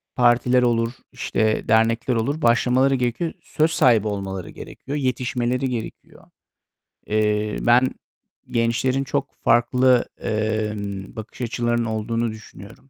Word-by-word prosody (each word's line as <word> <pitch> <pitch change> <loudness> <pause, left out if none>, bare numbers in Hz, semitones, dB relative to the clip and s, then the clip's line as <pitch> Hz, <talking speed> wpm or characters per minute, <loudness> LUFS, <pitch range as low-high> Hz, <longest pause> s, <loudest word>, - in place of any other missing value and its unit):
partiler 125 0 +3
olur, 115 -1 +1 0.2
işte 110 0 -1
dernekler 115 +2 +2
olur, 140 +8 -1
başlamaları 125 +2 +3
gerekiyor. 125 +6 -1
Söz 155 +1 0
sahibi 120 - +3
olmaları 95 -3 -4
gerekiyor, 140 +2 -7
yetişmeleri 125 -1 -1
gerekiyor. 115 -3 -7 0.8
Eee, 105 0 0
ben 125 +2 +4 0.6
gençlerin 120 +3 +1
çok 140 +1 -3
farklı, 125 +1 +3 0.2
emm, 105 -2 -3
bakış 110 +3 -9
açılarının 120 0 -1
olduğunu 115 +1 -2
düşünüyorum. 110 +3 -13
120 Hz, 105 wpm, -22 LUFS, 110-125 Hz, 0.8 s, ben